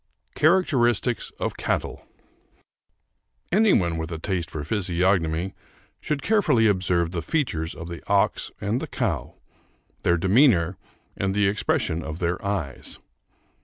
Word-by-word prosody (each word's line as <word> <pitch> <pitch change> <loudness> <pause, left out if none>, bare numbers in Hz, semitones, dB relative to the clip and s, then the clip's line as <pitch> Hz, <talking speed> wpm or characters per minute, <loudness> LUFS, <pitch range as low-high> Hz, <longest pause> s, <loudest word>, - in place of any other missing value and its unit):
CHARACTERISTICS 130 - +2
OF - - -2
CATTLE - - -2 1.5
Any 210 +3 +4
one 85 -4 +2
with 80 +1 -4
a 80 - -3
taste 85 +1 -2
for 75 - -5
physiognomy 90 -1 0 0.5
should 145 -3 -3
carefully 160 - +3
observe 90 -4 +2
the 90 -2 -3
features 80 - -1
of 85 - -7
the 85 -1 -7
ox 100 -1 +2
and 105 +5 -1
the - - -4
cow; - - -2 0.7
their 85 0 +3
demeanor 95 - +4 0.4
and 95 0 -1
the 105 -1 +3
expression 100 -5 0
of 80 -1 -6
their 85 +1 -2
eyes. 95 -10 -3
95 Hz, 130 wpm, -24 LUFS, 85-120 Hz, 1.5 s, Any